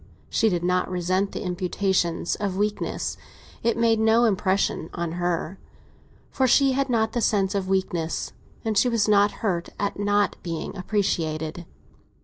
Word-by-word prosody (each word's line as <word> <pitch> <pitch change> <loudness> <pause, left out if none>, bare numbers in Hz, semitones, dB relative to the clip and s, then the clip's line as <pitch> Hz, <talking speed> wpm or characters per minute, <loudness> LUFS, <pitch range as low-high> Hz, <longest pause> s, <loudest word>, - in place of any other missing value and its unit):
She 225 - +3
did 175 -3 -1
not 180 +1 +1
resent 185 +2 0
the - - -5
imputation 180 -1 0
of 195 -2 -2
weakness; 210 +1 -2 0.4
it 235 0 +1
made 230 -1 +3
no 225 +2 +4
impression 190 -5 +1
on 170 -1 -2
her, 175 +1 -2 0.7
for 265 -1 +2
she 275 +2 +5
had 270 +1 0
not 220 -2 +1
the 240 - 0
sense 195 -3 +2
of 195 -2 -1
weakness, 175 -4 -1 0.3
and 220 -1 0
she 245 +5 +4
was 230 -3 +1
not 205 -1 +5 0.2
hurt 175 -4 -1
at 200 0 -2
not 205 0 +1
being 165 +3 -5
appreciated. 170 -5 -2
195 Hz, 150 wpm, -25 LUFS, 175-220 Hz, 0.7 s, she